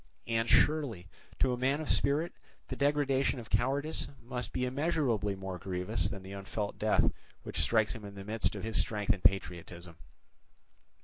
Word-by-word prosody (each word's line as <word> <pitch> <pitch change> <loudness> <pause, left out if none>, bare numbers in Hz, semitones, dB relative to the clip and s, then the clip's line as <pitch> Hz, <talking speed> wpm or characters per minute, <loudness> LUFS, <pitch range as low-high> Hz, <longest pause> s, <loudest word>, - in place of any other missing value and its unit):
And 115 -1 0
surely, 130 - +3 0.3
to 130 -2 +2
a - - -2
man 135 +3 +2
of 155 - -4
spirit, 150 +5 +2 0.4
the - - -3
degradation 140 -2 +2
of 115 - -10
cowardice 140 +8 +1
must 125 +1 -4
be 125 - 0
immeasurably 125 - 0
more 95 -1 -5
grievous 90 -1 -1
than 100 -3 -6
the 95 +1 -8
unfelt 100 +1 -4
death - - +3 0.3
which - - -3
strikes 110 -2 +3
him 115 -3 -9
in 100 -1 -8
the 100 - -7
midst 110 +2 0
of - - -5
his 110 0 -1
strength 105 0 0
and 100 - -8
patriotism! 85 -3 0
115 Hz, 170 wpm, -32 LUFS, 100-135 Hz, 0.4 s, surely